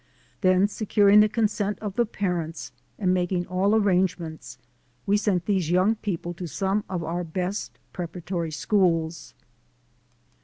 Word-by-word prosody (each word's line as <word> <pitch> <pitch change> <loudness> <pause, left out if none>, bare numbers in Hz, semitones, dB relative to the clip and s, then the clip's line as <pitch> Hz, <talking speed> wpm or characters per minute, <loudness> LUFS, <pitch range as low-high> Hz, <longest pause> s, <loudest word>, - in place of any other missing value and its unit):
Then 185 0 +4
securing 205 -1 +4
the 210 0 +5
consent 210 -2 0
of 205 -3 -6
the 240 -2 +2
parents 175 -6 -3 0.3
and 185 -3 +1
making 180 0 0
all 190 +4 +1
arrangements, 180 - 0 0.5
we 200 - +3
sent 200 -5 +1
these 190 -6 0
young 185 +5 +3
people 180 -5 -4
to 175 0 -6
some 195 +7 -1
of 180 -3 -3
our 175 +2 -2
best 180 +4 -4 0.2
preparatory 175 -1 -4
schools. 165 -1 0
185 Hz, 130 wpm, -25 LUFS, 175-205 Hz, 0.5 s, the